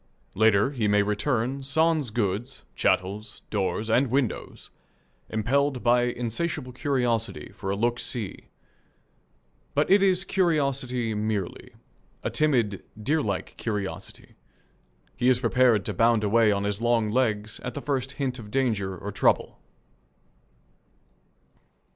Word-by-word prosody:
Later 110 +3 +3
he 120 -7 -1
may 105 0 +4
return, 120 +5 -1
sans 155 0 +2
goods, 110 +3 -2
chattels, 100 +4 -1
doors, 105 +1 -1
and 125 +5 +3
windows, 130 -2 -2 0.6
impelled 130 +4 0
by 120 0 +4
insatiable 125 +3 -3
curiosity 125 -4 -1
for 95 - -6
a 100 - 0
"look 120 +3 0
see." 110 -6 -3 1.3
But - - +2
it 200 +1 +6
is 190 -1 +3
curiosity 135 - 0
merely 105 -3 -3 0.5
a - - -2
timid, 120 -10 +1 0.2
deerlike 110 -5 -1
curiosity. 105 -4 -5 0.8
He 125 0 +2
is 125 -1 +4
prepared 120 -4 +3
to 105 - -2
bound 115 +2 +3
away 110 +1 +4
on 100 0 0
his 100 +1 -2
long 115 -2 +2
legs 110 -3 0
at 125 - -6
the - - -3
first 135 -2 -2
hint 135 -3 -3
of 105 -2 -9
danger 105 -7 0
or 100 +4 -6
trouble. 95 - +1
120 Hz, 125 wpm, -26 LUFS, 105-135 Hz, 1.3 s, it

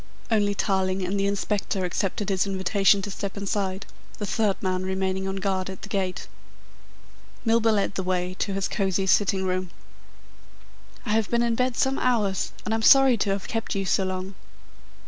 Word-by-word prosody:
Only 205 -2 +2
Tarling 190 -1 0
and 195 +2 -1
the 200 - +1
Inspector 200 -1 -1
accepted 195 +3 -2
his 190 0 +1
invitation 195 +1 +2
to 205 - -4
step 200 +1 -5
inside, 195 -1 -2 0.3
the 205 - -3
third 205 -1 0
man 185 -1 -1
remaining 190 0 -1
on 195 - -3
guard 190 -1 -1
at 190 - -9
the 210 - -8
gate. 190 -3 -2 1.2
Milburgh 225 -1 +3
led 200 0 0
the 195 - -2
way 180 0 -1
to 200 - -1
his 195 0 0
cosy 195 -2 0
sitting 190 +1 +3
room. 185 0 -1 1.4
"I 210 - -2
have 220 -1 +1
been 235 0 +2
in 235 -1 +1
bed 250 +1 0
some 265 0 +1
hours, 215 -6 +1
and 220 - -1
I'm 225 - 0
sorry 270 +2 +7
to 205 - 0
have 195 0 -2
kept 225 -2 -3
you 195 0 -1
so 190 - +2
long." 185 +1 -4
195 Hz, 180 wpm, -25 LUFS, 190-210 Hz, 1.4 s, sorry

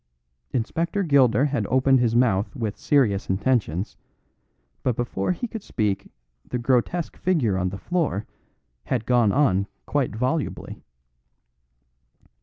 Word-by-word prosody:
Inspector 165 - -1
Gilder 135 - +4
had 145 -1 -1
opened 130 0 +4
his 120 -2 +1
mouth 110 -5 +2
with 110 -3 -3
serious 110 -7 +1
intentions, 95 -3 0 0.8
but 125 - 0
before 120 - -1
he 210 +7 -3
could 225 -1 -7
speak 100 - -2 0.3
the 125 - -4
grotesque 130 +7 0
figure 145 - +1
on 90 -1 0
the 95 - -6
floor 160 - -1 0.6
had 120 -4 -1
gone 120 -4 +3
on 100 -8 +2 0.2
quite 140 -7 -1
volubly. 130 +7 -2
125 Hz, 120 wpm, -24 LUFS, 105-145 Hz, 0.8 s, Gilder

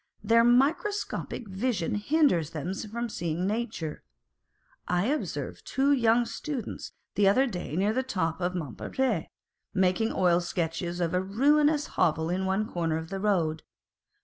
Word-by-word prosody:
Their 230 +2 +5
microscopic 275 - +1
vision 195 -2 -1
hinders 210 - +2
them 165 +3 -4
from 225 +4 -4
seeing 170 -4 -2
nature. 210 -7 -3 0.8
I 180 +2 +1
observed 295 +5 -3
two 275 +1 +1
young 240 -3 +4
students 270 -3 -5 0.2
the 200 -1 +3
other 255 +8 +5
day 180 - -4
near 200 +4 +2
the 260 - +1
top 185 -10 -2
of 180 +1 -1
Montmartre, 175 - -2 0.5
making 190 +4 +2
oil 175 -2 +3
sketches 175 0 -3
of 170 0 0
a 180 - +2
ruinous 290 +9 +3
hovel 160 -1 +1
in 190 +1 -1
one 195 +3 0
corner 165 -4 -1
of 160 0 -6
the 195 - -3
road. 170 -6 +1
195 Hz, 145 wpm, -28 LUFS, 175-240 Hz, 0.8 s, Their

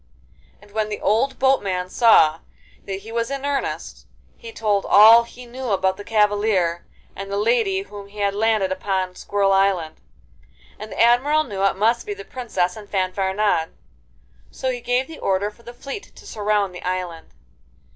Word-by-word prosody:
And 205 0 -19
when 215 0 -2
the 210 - -4
old 235 +6 +1
boatman 200 -9 +1
saw 165 -10 +5 0.5
that 195 0 -5
he 220 +3 -11
was 230 0 -2
in 275 0 -4
earnest, 285 -1 -4 0.3
he 465 -1 -11
told 210 - 0
all 225 +3 +7
he 250 +1 -13
knew 250 +1 -6
about 190 -2 +1
the 205 - -9
cavalier 205 -5 +1 0.3
and 195 0 -7
the 200 - -1
lady 210 -3 +1
whom 200 0 -11
he 205 +1 -17
had 200 -1 0
landed 210 -2 +1
upon 185 -1 -2
Squirrel 200 +1 0
Island, 190 -5 +1 0.8
and 215 +1 -8
the - - -7
Admiral 255 +7 +4
knew 200 -8 -6
it 195 - +2
must 225 - +1
be 410 - -3
the 410 0 -10
Princess 220 - -2
and 210 -2 -11
Fanfaronade; 190 -2 0 0.8
so 260 - -3
he 245 -1 -5
gave 245 +2 0
the 320 +2 -11
order 195 +2 0
for 225 - -22
the 235 - -10
fleet 275 +10 -9
to - - -15
surround 210 - -1
the 180 - -9
island. 180 -3 -4
210 Hz, 175 wpm, -22 LUFS, 190-235 Hz, 0.8 s, all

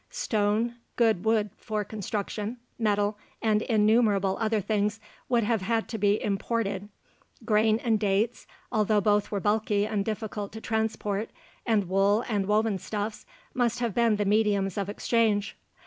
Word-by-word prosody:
Stone, 225 - 0 0.2
good 220 -6 +2
wood 215 -2 +2
for 215 -1 -3
construction, 210 +2 -4 0.2
metal, 205 -1 +1 0.2
and 215 -2 +2
innumerable 210 -3 +3
other 220 -1 +1
things 210 +1 0 0.3
would 240 -2 +3
have 220 -1 +1
had 225 +3 0
to 225 - -4
be 205 +1 +3
imported. 205 -1 -2 0.6
Grain 215 0 +3
and 225 -3 +2
dates 210 +3 0 0.2
although 215 -1 +2
both 205 0 +2
are 205 - 0
bulky 210 0 +1
and 210 -2 -1
difficult 210 -1 -4
to 220 - -6
transport 220 -2 -2 0.4
and 210 -5 +2
wool 200 +4 +3
and 205 -4 -1
woven 210 -1 +2
stuffs 210 +2 -4 0.3
must 240 -2 +1
have 235 -3 -1
been 230 -1 +3
the 205 0 -1
mediums 200 -2 +2
of 200 -1 -2
exchange. 210 -1 +1
210 Hz, 150 wpm, -27 LUFS, 205-225 Hz, 0.6 s, innumerable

